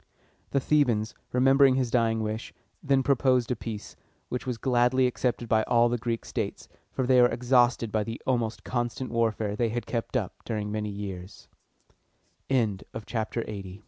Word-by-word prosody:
The 140 - +1
Thebans, 120 -7 +2 0.2
remembering 135 +1 +5
his 130 -3 0
dying 115 -2 +2
wish, 110 +1 -4 0.3
then 135 -2 +2
proposed 130 -2 +2
a - - +1
peace, 110 -2 -7 0.3
which 125 +1 -4
was 125 -2 -2
gladly 125 +1 +3
accepted 125 -1 -1
by 110 -1 +3
all 120 0 +4
the 120 0 -1
Greek 115 0 -3
states, - - -4 0.2
for 130 - -1
they 125 0 +5
were 120 - +7
exhausted 120 -1 +2
by 110 0 +1
the 115 +2 -6
almost 120 -4 -1
constant 120 +1 -3
warfare 110 -3 0
they 115 +1 +1
had 120 +2 -3
kept 120 +2 -2
up 105 -7 -3
during 105 -2 -3
many 105 0 -2
years. 100 -2 -7 1.0
LXXXI. 110 -3 -3
120 Hz, 155 wpm, -27 LUFS, 110-125 Hz, 1.0 s, were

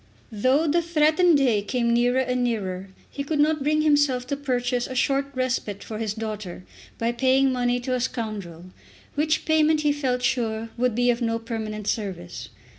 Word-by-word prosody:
Though 255 +8 +2
the 335 +3 +2
threatened 330 0 +3
day 245 -7 +2
came 235 +3 0
nearer 245 +2 +3
and 250 -1 0
nearer 195 -5 -2 0.2
he 280 - -4
could 295 +1 -2
not 305 0 +3
bring 305 +2 +2
himself 290 -4 +2
to 280 - -2
purchase 250 -3 -1
a 260 - -7
short 275 +2 +1
respite 255 -6 -2
for 215 -1 -6
his 215 -2 -2
daughter 215 -5 -6 0.3
by 230 +1 0
paying 260 +2 +3
money 245 -1 +1
to 255 +1 -2
a 255 - 0
scoundrel, 205 -8 -5 0.4
which 310 +1 0
payment 315 -1 +3
he 295 -1 +2
felt 260 -4 -1
sure 225 -3 -1
would 245 -2 0
be 245 +1 +3
of 240 +1 -3
no 230 -1 0
permanent 220 -2 -5
service. 195 - -4
250 Hz, 180 wpm, -24 LUFS, 225-280 Hz, 0.4 s, threatened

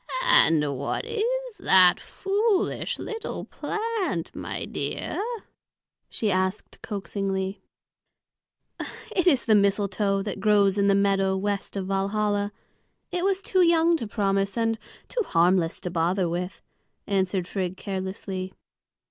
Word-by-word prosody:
"And 150 - +5
what 140 - -2
is 465 +1 -2
that 185 -2 +6
foolish 400 +1 -1
little 445 0 -5
plant, 430 - -3
my - - -4
dear?" - - -3 0.9
she 215 -2 -1
asked 185 +2 -2
coaxingly. 195 -2 -3 1.5
"It 360 -1 +2
is 280 -7 +4
the 225 - +4
mistletoe 200 -1 +2
that 205 -1 -5
grows 205 -2 +3
in 200 - +3
the 200 - +4
meadow 195 -1 +2
west 200 +1 -2
of 190 - -2
Valhalla. 205 +1 0 0.6
It 355 0 -1
was 390 0 +1
too 375 - +2
young 335 -1 +4
to 230 - -5
promise, 195 -1 0
and 225 -1 0 0.3
too - - -1
harmless 175 - +2
to 180 - -4
bother 175 +2 +1
with," 180 +3 -4 0.4
answered 190 -2 0
Frigg 185 -2 -3
carelessly. 190 -1 -5
200 Hz, 120 wpm, -25 LUFS, 190-275 Hz, 1.5 s, that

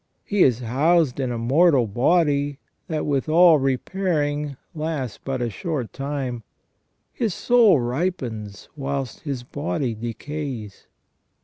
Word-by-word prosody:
He 205 -2 0
is 125 -5 +4
housed 140 +4 +2
in 130 -2 -1
a 120 - -2
mortal 135 +3 +4
body 145 - +2 0.3
that 155 -3 -2
with 140 0 0
all 165 -1 +6
repairing 145 0 -1 0.2
lasts 150 -8 -3
but 130 -2 -2
a 120 - -1
short 150 - -4
time. 135 -4 -3 0.7
His 225 -7 -1
soul 235 - +5
ripens 120 - -3
whilst 135 -3 -3
his 135 -5 -4
body 140 -1 -2
decays. 120 -1 -6
140 Hz, 120 wpm, -23 LUFS, 125-160 Hz, 0.7 s, all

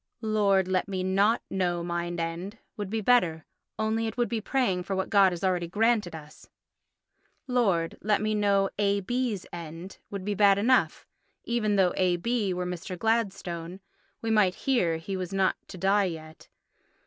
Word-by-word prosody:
"Lord, 200 -3 +2
let 185 0 0
me 190 -2 -3
not 195 +4 +2
know 175 -2 -1
mine 175 0 -3
end" 170 +6 -4 0.2
would 205 -2 -5
be 220 +1 -2
better, 180 -9 +2 0.3
only 220 +1 0
it 220 - -6
would 240 -1 +1
be 230 -2 -2
praying 215 -7 0
for 195 +2 -3
what 190 +2 -2
God 200 -3 +6
has 175 0 -6
already 180 -2 +1
granted 210 -2 +1
us. 155 -1 -13 1.0
"Lord, 200 -11 0
let 210 0 +2
me 215 0 0
know 200 -2 +2
A.B.'s 205 +2 0
end" 170 +2 -8
would 200 -2 -6
be 205 - 0
bad 200 -1 +5
enough. 250 +5 +2 0.4
Even 220 -3 0
though 190 -2 +3
A.B. 190 +4 +1
were 180 0 -2
Mr. 180 +1 -5
Gladstone—we 195 -1 -3
might 205 -4 +3
hear 185 -12 +2
he 175 +4 -5
was 185 -2 -4
not 195 -1 +2
to - - -10
die 195 +3 +3
yet. 160 -3 -8
195 Hz, 160 wpm, -27 LUFS, 180-215 Hz, 1.0 s, God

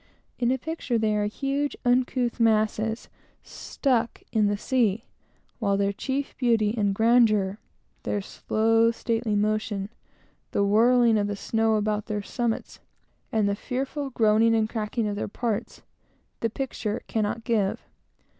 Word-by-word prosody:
In 240 -1 +2
a 260 - +2
picture, 285 -3 -2
they 215 -1 +1
are 210 0 +1
huge, 275 +6 -2
uncouth 245 0 +1
masses, 220 0 +1 0.4
stuck 245 -4 -2
in 215 -2 +3
the 205 0 0
sea, 230 -1 0 0.5
while 200 -3 +1
their 200 0 +1
chief 270 +6 -3
beauty 225 -4 +2
and 205 -3 +1
grandeur, 215 -3 +3 0.4
their 205 - -2
slow, 225 +3 +1
stately 230 -1 -1
motion; 210 -1 -1 0.6
the 200 - +2
whirling 230 +2 +4
of 205 - 0
the 205 - -3
snow 225 +2 +1
about 210 0 -1
their 210 -1 -3
summits, 235 +2 -3 0.5
and 215 -2 +2
the 200 - +1
fearful 270 +5 -3
groaning 225 -1 +3
and 220 -1 +1
cracking 220 0 -2
of 205 - -2
their 205 - -3
parts, 225 +1 -3 0.6
the 230 - 0
picture 225 -3 -4
cannot 220 +1 -2
give. 215 -5 0
225 Hz, 140 wpm, -26 LUFS, 210-240 Hz, 0.6 s, whirling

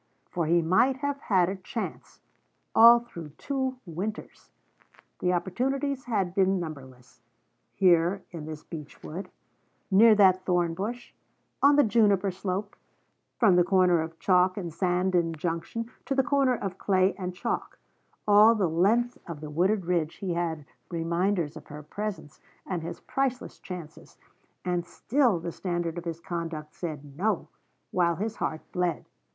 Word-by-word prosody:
For 170 -3 -1
he 170 +1 +3
might 185 +11 +3
have 285 +1 -3
had 185 -9 +2
a 190 - -2
chance, 205 +4 -6 0.5
all 235 +1 +8
through 170 -11 -10
two 265 -2 -2
Winters. 190 +5 -6 0.7
The 180 - +1
opportunities 260 +10 -1
had 200 -7 -1
been 190 0 +2
numberless. 130 -8 -9 0.5
Here, 180 0 +3
in 160 -4 -7
this 155 -1 -7
beech 150 -4 -10
wood; 175 +6 -7 0.6
near 215 +3 +7
that 185 -2 +5
thornbush; 185 +7 -2 0.5
on 285 +1 +6
the 290 - +6
juniper 205 -4 +3
slope; 190 +2 -4 0.6
from 200 -7 +5
the 175 - +6
corner 180 -2 +3
of 160 0 -6
chalk 185 +1 +3
and 175 -5 -5
sand 180 +1 0
in 170 -2 +2
junction, 170 +9 -4
to 275 - -1
the 270 - +3
corner 275 -2 +2
of 195 -4 -5
clay 190 -1 +2
and 180 -2 -5
chalk; - - -3 0.5
all 210 +2 +7
the 200 -5 +1
length 210 +9 +1
of 170 -4 -6
the 150 0 -8
wooded 185 +5 +1
ridge 170 -3 0
he 185 -3 -3
had 165 -3 -2 0.2
reminders 170 -1 -1
of 155 - -11
her 150 0 -9
presence 200 -2 -6 0.3
and 180 -3 -3
his 170 +1 -7
priceless 255 -1 -2
chances: 175 -4 -10 0.5
and 175 -1 0
still 240 -1 +1
the 170 +1 -5
standard 175 -2 -3
of 175 - -11
his 165 -1 -4
conduct 165 -4 -5
said 150 -5 -7
No, 200 +3 -1 0.4
while 170 -2 +2
his 220 +5 -4
heart 155 - -2
bled. 180 -3 -1
180 Hz, 150 wpm, -27 LUFS, 170-210 Hz, 0.7 s, all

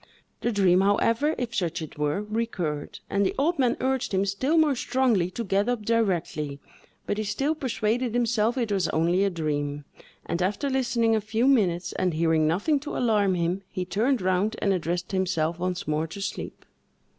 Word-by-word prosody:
The 240 - 0
dream, 190 -3 +4
however, 230 +9 +2
if 240 -1 -3
such 175 -6 -1
it 160 -2 -7
were, 150 +7 0
recurred, 210 -9 -3
and 200 - +1
the 190 - 0
old 315 +3 +1
man 250 -2 +2
urged 260 -5 0
him 190 +1 +2
still 260 +11 0
more 310 -3 +4
strongly 240 -8 +1
to 230 +6 -4
get 200 +2 +1
up 240 -4 -2
directly; 175 -10 0 0.5
but 205 - -2
he - - 0
still 270 +9 0
persuaded 240 -4 -1
himself 235 0 +1
it 235 -4 -1
was 190 -4 +1
only 170 +4 +2
a 200 - +2
dream; 145 -4 -3 0.4
and 170 +1 -2
after 210 +10 0
listening 235 -3 +2
a 220 - +1
few 220 +3 0
minutes, 185 -9 +2
and 180 -3 0
hearing 160 -1 +2
nothing 205 - +1
to 295 +2 -5
alarm 210 -6 +2
him, 175 +2 -1
he 185 -2 -4
turned 220 +5 0
round 185 +4 +1
and 200 - +2
addressed 175 0 -2
himself 175 -3 0
once 180 0 -3
more 155 +1 0
to 165 - -9
sleep. 195 - -5
200 Hz, 185 wpm, -26 LUFS, 175-235 Hz, 0.5 s, dream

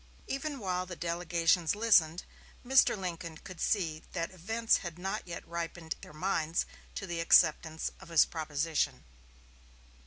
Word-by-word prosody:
Even 280 +1 -3
while 185 -5 -2
the 180 - -6
delegations 170 0 +1
listened, 185 -6 +4 0.4
Mr. 260 -3 +5
Lincoln 170 -4 -5
could 185 +1 -10
see 160 -6 0
that 165 -1 -2
events 220 +6 +1
had 170 -2 -7
not 190 +2 -4
yet 170 - -7
ripened 170 -1 -4
their - - -11
minds 160 0 0 0.3
to 195 - -4
the 175 -2 -4
acceptance 160 -1 +4
of - - -13
his 165 -2 +6
proposition. 150 -3 -1
170 Hz, 135 wpm, -31 LUFS, 160-190 Hz, 0.4 s, his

